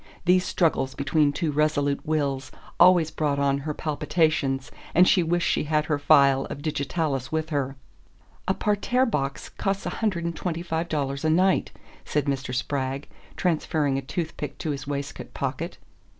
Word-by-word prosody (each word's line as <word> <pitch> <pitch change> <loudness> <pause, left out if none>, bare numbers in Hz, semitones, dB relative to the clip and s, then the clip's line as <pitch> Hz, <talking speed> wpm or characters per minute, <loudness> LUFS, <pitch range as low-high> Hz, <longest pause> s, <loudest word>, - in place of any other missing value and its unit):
These 180 +1 +4
struggles 135 -6 +1
between 145 +1 +2
two 155 +1 -1
resolute 145 -1 +1
wills 140 -3 -1 0.3
always 175 -3 +6
brought 145 -2 0
on 140 0 +2
her 150 +2 -3
palpitations, 150 -4 0 0.2
and 180 +2 +7
she 185 - +5
wished 170 +1 +1
she - - +1
had 150 0 +1
her 150 -2 0
phial 140 -2 +5
of 145 - -7
digitalis 145 -3 -2
with 160 0 -2
her. 140 -2 -1 0.7
"A 190 - +2
parterre 215 +5 +1
box 140 - -2
costs 195 0 -2
a - - -2
hundred 185 -6 0
and 170 0 -2
twenty 170 -2 -3
five 165 0 -2
dollars 140 -2 -2
a 160 - +2
night," 185 +4 +3 0.3
said 150 -1 -1
Mr. 135 -2 -2
Spragg, 135 +2 -2 0.3
transferring 155 -5 +1
a - - -5
toothpick 155 +1 -4
to 155 - -2
his 140 -1 -5
waistcoat 140 -1 -5
pocket. - - -3
150 Hz, 165 wpm, -25 LUFS, 140-170 Hz, 0.7 s, and